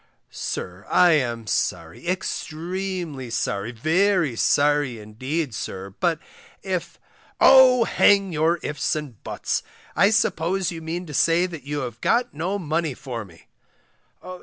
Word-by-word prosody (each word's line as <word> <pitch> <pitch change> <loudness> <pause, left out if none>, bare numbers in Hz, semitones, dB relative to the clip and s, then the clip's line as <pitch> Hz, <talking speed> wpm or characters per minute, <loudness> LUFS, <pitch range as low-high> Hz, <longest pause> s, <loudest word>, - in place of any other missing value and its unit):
Sir, 90 +2 -5
I 180 -1 +5
am 120 -7 0
sorry, 85 - -2
extremely 175 -5 -3
sorry, 115 -2 -2
very 160 - +1
sorry, 145 -1 +2
indeed, 130 +7 -4
sir, 95 -1 -6
but 170 -3 +1 0.5
if 185 -3 -4 0.4
Oh! 260 -2 +7
hang 200 -4 +3
your 160 +3 +2
ifs 150 0 -1
and 150 -2 -4
your 115 - -23
buts, - - -2 0.3
I 200 - +5
suppose 190 -4 +1
you 165 -1 -7
mean 170 +3 -4
to 150 - -9
say 165 +5 +3
that 165 -7 -8
you 145 0 -3
have 120 -3 -6
got 240 +1 +1
no 175 +7 -2
money 160 -4 -2
for 120 -5 -6
me? 85 -5 -17
160 Hz, 135 wpm, -23 LUFS, 125-180 Hz, 0.5 s, Oh